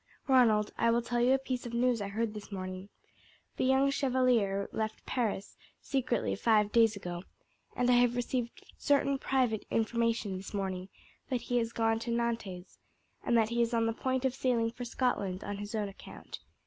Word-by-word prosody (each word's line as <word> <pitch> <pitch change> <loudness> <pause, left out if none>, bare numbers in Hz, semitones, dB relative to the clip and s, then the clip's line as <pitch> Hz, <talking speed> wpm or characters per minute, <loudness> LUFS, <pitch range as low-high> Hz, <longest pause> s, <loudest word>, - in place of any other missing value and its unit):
"Ronald, 225 -6 +4
I 230 - +3
will 235 +1 +2
tell 240 0 -1
you 250 +2 +5
a - - +5
piece 255 -2 -4
of 235 - -5
news 240 -2 +2
I 200 - -2
heard 215 +2 -2
this 210 0 -9
morning. 185 0 -6 0.7
The - - +1
young 265 +1 +4
Chevalier 250 -8 +2
left 220 0 -4
Paris 220 -5 -2 0.2
secretly 260 -3 -1
five 210 -2 +3
days 225 -1 +4
ago, 175 -3 -5 0.5
and 245 - +1
I 250 - +5
have 245 0 +4
received 245 -1 -3
certain 280 -1 +2
private 250 -6 +1
information 230 -3 0
this 190 +2 -8
morning 190 -1 -3 0.4
that 250 -2 -1
he 245 0 0
has 230 -1 -2
gone 225 -1 +1
to 235 - -5
Nantes, 230 -6 -3 0.4
and 235 - +2
that 220 -1 +3
he 235 0 +1
is 235 0 +1
on 230 0 +2
the 225 - 0
point 260 +2 -1
of 260 - +1
sailing 240 -3 +1
for 245 +1 -7
Scotland 210 -6 -1
on 205 0 -4
his 205 +2 -6
own 210 -2 -1
account. 195 - -10
230 Hz, 185 wpm, -31 LUFS, 210-245 Hz, 0.7 s, you